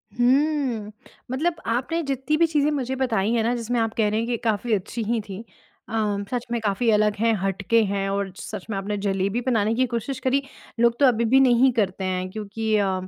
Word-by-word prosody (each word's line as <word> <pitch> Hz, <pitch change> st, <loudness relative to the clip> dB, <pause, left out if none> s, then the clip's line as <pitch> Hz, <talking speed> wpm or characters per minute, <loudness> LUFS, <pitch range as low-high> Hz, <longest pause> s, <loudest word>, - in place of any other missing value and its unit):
हुँ। 255 Hz, -3 st, +1 dB, 0.4 s
मतलब 320 Hz, +6 st, 0 dB
आपने 255 Hz, +9 st, 0 dB
जितनी 275 Hz, +1 st, -1 dB
भी 335 Hz, -, +5 dB
चीज़ें 300 Hz, -2 st, +2 dB
मुझे 265 Hz, -2 st, -2 dB
बताई 225 Hz, -5 st, 0 dB
है 230 Hz, -, +2 dB
ना, 235 Hz, +2 st, +1 dB
जिसमें 240 Hz, 0 st, -1 dB
आप 225 Hz, -1 st, 0 dB
कह 215 Hz, -2 st, +1 dB
रहे 215 Hz, -, 0 dB
हैं 230 Hz, -, -2 dB
कि 240 Hz, -1 st, -1 dB
काफ़ी 220 Hz, 0 st, 0 dB
अच्छी 210 Hz, +4 st, -2 dB
हीं 230 Hz, +2 st, 0 dB
थी। 200 Hz, 0 st, -8 dB, 0.5 s
अ, -, -, -8 dB, 0.4 s
सच 245 Hz, -1 st, -2 dB
में 235 Hz, -, 0 dB
काफ़ी 215 Hz, +3 st, 0 dB
अलग 210 Hz, -1 st, +3 dB
है, 230 Hz, 0 st, +3 dB
हटके 195 Hz, +4 st, +2 dB
हैं, 195 Hz, -1 st, -1 dB
और 200 Hz, -1 st, -2 dB
सच 210 Hz, -2 st, -7 dB
में 205 Hz, -, -2 dB
आपने 205 Hz, +1 st, -3 dB
जलेबी 195 Hz, +4 st, 0 dB
बनाने 220 Hz, -3 st, +2 dB
की 255 Hz, +2 st, +2 dB
कोशिश 260 Hz, +3 st, -3 dB
करी, 265 Hz, +2 st, +1 dB, 0.4 s
लोग 235 Hz, 0 st, +3 dB
तो 285 Hz, -, +6 dB
अभी 235 Hz, -3 st, +3 dB
भी -, -, +8 dB
नहीं 255 Hz, 0 st, +5 dB
करते 195 Hz, -4 st, -1 dB
हैं, 185 Hz, 0 st, -2 dB
क्योंकि 215 Hz, +1 st, -2 dB
अम 190 Hz, -2 st, -1 dB
230 Hz, 210 wpm, -24 LUFS, 205-255 Hz, 0.5 s, भी